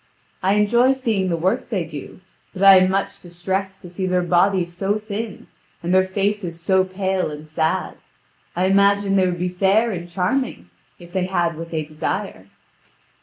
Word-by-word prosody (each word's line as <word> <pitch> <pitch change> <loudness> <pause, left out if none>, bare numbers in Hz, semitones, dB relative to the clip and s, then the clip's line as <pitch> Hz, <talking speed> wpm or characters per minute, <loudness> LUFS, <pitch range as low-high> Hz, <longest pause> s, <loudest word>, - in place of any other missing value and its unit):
I 190 +2 +2
enjoy 235 +5 +4
seeing 225 -8 -1
the 170 - 0
work 190 +11 -1
they 195 -7 -1
do, 150 +3 -9 0.3
but 190 - -3
I 195 -1 +9
am 185 0 +4
much 195 +1 -2
distressed 190 +2 -4
to 175 - -9
see 185 +1 -3
their 180 -1 +1
bodies 175 0 +2
so 200 +3 0
thin, 215 0 -6 0.4
and 175 +2 0
their 185 0 +4
faces 195 -3 -2
so 190 +2 +2
pale 190 -1 -2
and 150 +1 -9
sad. 160 +1 -1 0.6
I 180 +2 +1
imagine 200 +1 +3
they 190 -1 +3
would 175 -1 -2
be 180 +1 -1
fair 195 +5 +2
and 175 -3 -6
charming, 180 - -2 0.3
if 175 -1 -15
they 185 -1 0
had 170 -3 0
what 165 +1 -7
they 160 -2 -2
desire." 155 - -4
185 Hz, 175 wpm, -21 LUFS, 175-200 Hz, 0.6 s, I